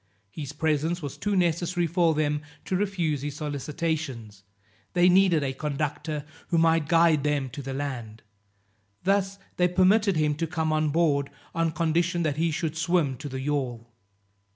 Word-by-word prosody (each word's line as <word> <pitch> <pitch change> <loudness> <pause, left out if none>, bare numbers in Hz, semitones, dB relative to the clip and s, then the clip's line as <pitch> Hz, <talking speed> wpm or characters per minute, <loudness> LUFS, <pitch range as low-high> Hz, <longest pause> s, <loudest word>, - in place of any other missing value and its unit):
His 140 +3 -6
presence 160 +2 0
was 140 - -5
too 205 -1 -1
necessary 175 0 +1
for 165 -1 +2
them 150 -1 0 0.2
to 185 - -1
refuse 180 -7 0
his 145 0 -4
solicitations, 145 - -3 0.5
they 175 0 +5
needed 180 -4 +4
a 135 -1 -1
conductor 150 +1 -3 0.2
who 170 - +1
might 165 -2 +3
guide 165 -3 +4
them 145 -3 0
to 140 - -6
the 135 0 -5
land; 120 -6 -5 0.8
thus 195 +1 +1 0.2
they 180 - +4
permitted 190 +3 +3
him 150 -1 +2
to 165 +1 -1
come 160 -2 -1
on 155 0 +1
board, 145 -3 +2 0.2
on 165 0 +1
condition 170 +1 0
that 150 -2 -1
he 165 +1 +2
should 160 0 -2
swim 165 -4 +1
to 145 +1 -7
the 130 0 -5
yawl. 125 -5 -3
155 Hz, 160 wpm, -26 LUFS, 145-170 Hz, 0.8 s, they